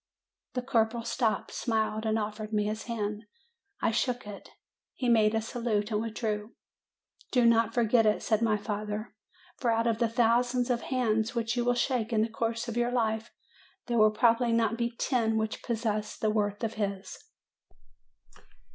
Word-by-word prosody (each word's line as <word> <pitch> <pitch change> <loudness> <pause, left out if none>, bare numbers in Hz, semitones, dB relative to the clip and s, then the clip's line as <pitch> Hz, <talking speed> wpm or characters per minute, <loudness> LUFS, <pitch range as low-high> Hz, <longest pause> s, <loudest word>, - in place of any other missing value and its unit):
The 250 - -1
corporal 230 -2 +1
stopped, 235 -1 -1
smiled, 220 -1 -1
and 220 0 +2
offered 215 0 -4
me 210 -1 +1
his 215 +1 -3
hand; 215 -3 -3 0.6
I - - +2
shook 245 +1 -1
it; 205 -1 -9 0.5
he 255 - -2
made 220 -2 +4
a 220 - +1
salute 225 -2 -1
and 210 0 +1
withdrew. 220 -1 -3 0.8
"Do 245 -2 +3
not 230 -1 +3
forget 230 -1 +4
it," 210 - +1
said 220 -1 +1
my 220 -2 +2
father; 210 0 -4 0.4
"for 245 - 0
out 230 0 +2
of 230 -1 +1
the 235 -2 +2
thousands 245 +2 +2
of 240 -1 0
hands 225 -3 0
which 230 0 -1
you 240 - +1
will 245 0 +2
shake 245 -2 0
in 215 -1 +3
the 230 - -1
course 230 +1 -2
of 235 0 -4
your 240 0 +2
life 225 -2 0 0.6
there 235 -2 0
will 215 0 +7
probably 230 +2 +3
not 230 -1 +2
be 235 0 -1
ten 225 -4 +1
which 220 0 -2
possess 220 -3 -2
the 215 - +1
worth 205 0 -1
of 225 0 -1
his." 195 -1 -4
225 Hz, 175 wpm, -29 LUFS, 215-235 Hz, 0.8 s, will